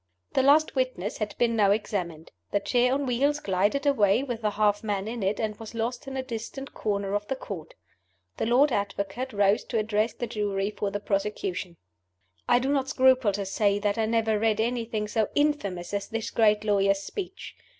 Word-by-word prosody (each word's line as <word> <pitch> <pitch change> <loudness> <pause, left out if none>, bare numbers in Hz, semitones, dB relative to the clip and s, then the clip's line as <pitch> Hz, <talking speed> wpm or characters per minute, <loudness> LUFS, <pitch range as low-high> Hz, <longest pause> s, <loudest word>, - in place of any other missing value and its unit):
The - - +3
last 290 +4 +4
witness 255 -7 -2
had 215 -1 -3
been 235 -1 +2
now 205 -3 +4
examined. 180 -6 -2 0.2
The 205 - +1
chair 245 +4 +2
on 280 +1 0
wheels 275 +4 +1
glided 205 +7 0
away 225 -4 +3
with 240 -4 -4
the 215 - +1
half 205 0 +1
man 205 -2 -2
in 230 0 -4
it, 195 +2 0
and 215 -2 -1
was 225 0 -9
lost 235 +3 -3
in 270 0 -5
a 260 - -2
distant 260 +3 -6
corner 200 -2 -2
of 205 0 -1
the 270 - -1
Court. 180 -10 -8 0.6
The - - -1
Lord 265 +5 +4
Advocate 200 +4 -2
rose 200 -1 +2
to 235 - -2
address 215 +1 +1
the 240 - -4
Jury 205 -3 -2
for 205 -1 -2
the 205 - -3
prosecution. 195 -3 -2 0.7
I - - +6
do 260 +2 0
not 270 -1 0
scruple 260 -5 +4
to 200 0 -2
say 200 +1 +1
that 205 +1 -1
I 220 - +1
never 220 -1 +1
read 220 -1 +1
anything 225 -2 -1
so 215 0 0
infamous 205 -13 0
as 200 -1 -2
this 225 0 -4
great 210 -2 +3
lawyer's 200 -1 +2
speech. 380 - -7
215 Hz, 195 wpm, -27 LUFS, 200-245 Hz, 0.7 s, I